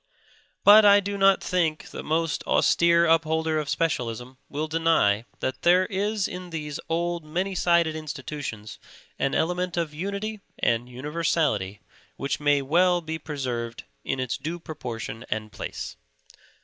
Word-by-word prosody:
But 210 +2 +9
I 205 0 +7
do 200 0 -3
not 195 -1 +4
think 160 -4 -1
the - - -6
most 165 0 -1
austere 170 0 +4
upholder 160 -1 +2
of 150 -2 -4
specialism 125 -5 -2
will 150 +2 -3
deny 160 -10 +2 0.2
that 130 - -2
there 180 +2 +5
is 205 +1 -1
in 180 0 -7
these 150 -3 -5
old, 170 0 -1
many 180 +6 -2
sided 170 -3 +2
institutions 140 -7 -6 0.4
an 135 - 0
element 180 +1 0
of 165 -3 -1
unity 200 +6 -4 0.2
and 120 +1 0
universality 130 - -1 0.3
which 140 - -2
may 145 -1 +2
well 175 +5 +3
be 160 0 -5
preserved 125 -6 -4 0.2
in 135 - -2
its 130 -2 -2
due 160 +5 -4
proportion 120 -8 -6
and 110 0 -3
place. - - -6
160 Hz, 140 wpm, -25 LUFS, 135-175 Hz, 0.4 s, But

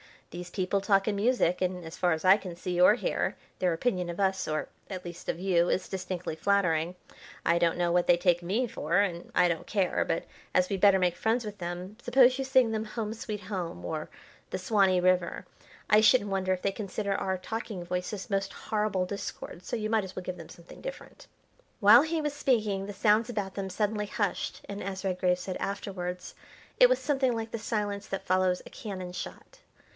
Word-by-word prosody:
"These 175 +1 -7
people 190 +1 0
talk 195 -1 +3
in 210 - +1
music, 205 -5 +2
and, 180 -1 -1
as 160 - -8
far 175 -2 +2
as 160 - -4
I 190 +2 +8
can 185 -5 -7
see 180 0 -3
or 180 +4 +7
hear, - - -1 0.2
their 180 -2 +2
opinion 180 -1 -1
of 170 - -5
us, 190 -1 +1
or, 155 0 -2 0.2
at 185 -3 -6
least, 175 -1 -8
of - - -2
you, 175 -3 +3
is - - -1
distinctly 185 -3 -4
flattering. 175 -2 +1 0.5
I 170 +1 +3
don't 170 -1 +2
know 175 -1 +1
what 175 0 +2
they 175 - +7
take 175 -1 +2
me 200 +9 0
for, 170 -7 -1
and 180 -4 0
I 180 -1 +5
don't 165 -2 -3
care, 195 -4 +1
but - - -1 0.3
as 185 0 +3
we'd 195 - -1
better 200 -2 +7
make 180 -2 +1
friends 225 +1 +1
with 210 -1 -6
them 180 +4 -5
suppose 255 +1 +5
you 270 - -1
sing 260 -3 +4
them 220 0 -2
'Home, 215 0 -4
Sweet 215 -2 -5
Home,' 180 - -5
or 155 - -4 0.4
the - - -1
'Swanee 185 -1 +3
River.' 180 -1 +1 0.4
I 210 - +7
shouldn't 215 -1 +5
wonder 190 -1 +1
if 185 - -4
they 200 - +1
consider 200 0 -3
our 190 -1 -1
talking 210 -1 -5
voices 180 +3 -4
most 195 -1 -1
horrible 210 -4 -1
discords, 185 -2 -7
so - - -2
you 215 -2 -2
might 220 -3 +2
as 190 - -10
well 185 - -5
give 180 0 -5
them 165 - -10
something 170 0 -13
different." - - -9 0.5
While 215 +6 +8
he 320 0 -1
was 295 -1 -2
speaking 215 -9 +1
the 205 - -6
sounds 215 +3 +3
about 205 -5 -3
them 195 -1 -4
suddenly 210 +2 -1
hushed, - - -2
and, 200 0 -6
as 190 0 -5
Redgrave 180 -1 +1
said 180 0 -5
afterwards, 180 -3 -4 0.5
it - - +8
was - - +4
something 270 -5 +1
like 225 0 -4
the 230 - -3
silence 205 -2 -2
that 195 - -4
follows 185 0 +2
a - - -10
cannon 185 -4 -6
shot. - - -8
195 Hz, 210 wpm, -29 LUFS, 180-215 Hz, 0.5 s, I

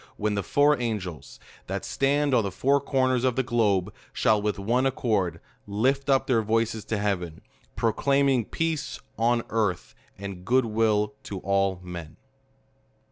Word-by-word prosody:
when 105 0 0
the 100 - 0
four 145 +6 +3
angels, 100 -9 -4 0.3
that - - -4
stand 140 +1 +1
on 115 - +4
the 100 - -1
four 140 +8 +2
corners 130 -3 +1
of 130 -2 +2
the 130 - +1
globe, 105 -7 +1 0.2
shall, 105 -1 +2
with 105 0 -1
one 120 +7 +1
accord, 100 -10 0 0.3
lift 130 +8 0
up 135 -1 +3
their 120 -4 +2
voices 110 0 0
to 110 - -2
heaven; 95 -5 -2 0.3
proclaiming 135 +3 +2
PEACE 155 +2 -2 0.2
ON 120 +1 +2
EARTPI, 105 -6 -1 0.2
AND 95 -2 -7
GOOD 125 +5 +3
WILL 105 -1 +1
TO 100 - -6
ALL 95 -1 +1
MEN. 85 -3 -8
115 Hz, 150 wpm, -26 LUFS, 100-130 Hz, 0.3 s, on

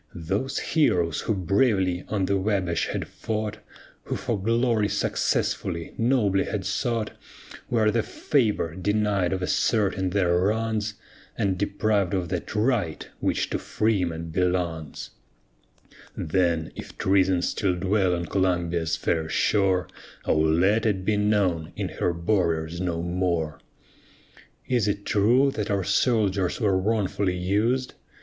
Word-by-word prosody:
Those 100 +11 -2
heroes, 90 - +1
who 110 - -1
bravely 95 -1 +1
on 100 -3 0
the 100 +1 +1
Wabash 95 -3 0
had - - -3
fought, 110 -1 -4 0.5
Who - - -3
for 110 -5 -2
glory 115 -1 +2
successfully 85 -4 -1
nobly 115 -5 +2
had 100 -3 -3
sought, 110 +1 -1 0.6
Where 110 -3 +3
the 115 - +1
favor 105 - 0
denied 100 0 0
of 95 -1 -2
asserting 95 -1 +1
their 90 -2 +2
wrongs, 105 +1 0 0.4
And 95 -2 +1
deprived 100 0 0
of 90 -3 -2
that 90 +3 -4
right 105 -7 0
which - - -1
to - - -1
freemen 85 -7 -1
belongs. 90 -3 -2 1.0
Chorus - - -5
Then 85 -3 +1
if - - -9
treason 95 -2 +2
still 95 -3 0
dwell 95 0 +1
on 85 0 -3
Columbia's 85 -2 0
fair 80 -2 -1
shore, 95 -2 +2 0.4
O - - +2
let 85 +8 +3
it 95 -3 -1
be 110 - +2
known 100 -6 +1
in - - -3
her - - +2
borders 85 -2 0
no 85 -2 -2
more! 85 -3 -1 1.1
Is 120 -5 +1
it 100 0 -2
true 120 +7 +3
that 105 -4 -3
our 100 -2 +1
soldiers 100 -5 +1
were 105 -5 +2
wrongfully 95 -2 0
us'd? 110 +8 0
95 Hz, 130 wpm, -25 LUFS, 90-105 Hz, 1.1 s, Where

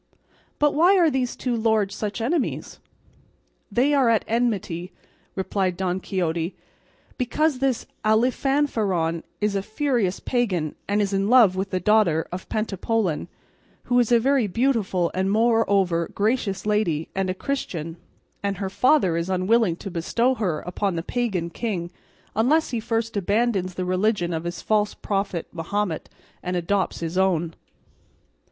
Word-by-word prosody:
"But 295 -1 +3
why 355 +6 +5
are 335 -4 +4
these 255 -2 -1
two 250 -2 -2
lords 220 -3 +1
such 210 +2 -4
enemies?" 280 +5 -2 0.9
"They 255 +8 +2
are 270 -4 +4
at 225 -2 +2
enmity," 200 -7 -1 0.4
replied 190 -1 -1
Don 185 -1 -1
Quixote, 170 -2 -2 0.6
"because 260 +3 +1
this 265 -3 0 0.2
Alifanfaron 220 - +1 0.2
is 210 -1 +1
a 195 - +1
furious 220 -3 -1
pagan 190 - -1
and 205 +1 +2
is 200 0 -2
in 195 +1 +1
love 230 -7 +6
with 190 +1 -2
the 185 - -1
daughter 180 -5 +3
of 180 +1 -7
Pentapolin, 215 -4 -1 0.6
who 245 0 +2
is 245 -1 +2
a 235 - +6
very 265 -1 +2
beautiful 205 -6 +1
and 190 +1 0
moreover 200 -6 +2
gracious 205 -3 0
lady, 200 -8 0
and 190 -1 -1
a 185 - -1
Christian, 175 - -4 0.4
and 200 -1 -2
her 190 -1 -3
father 250 - +3
is 170 +2 -2
unwilling 190 +1 +2
to 195 +3 -8
bestow 230 +9 +1
her 190 -10 -1
upon 180 +1 -2
the 165 - -2
pagan 195 -7 -2
king 175 -4 -3 0.4
unless 275 +9 +2
he 235 - -1
first 225 0 -2
abandons 200 -2 0
the 185 - -2
religion 185 -1 +1
of 160 +1 -3
his 175 0 -5
false 210 -1 +1
prophet 195 -4 -2
Mahomet, 175 +1 -2 0.3
and 180 0 -3
adopts 185 +2 -1
his 165 +2 -2
own." 170 -3 +1
200 Hz, 145 wpm, -24 LUFS, 180-235 Hz, 0.9 s, love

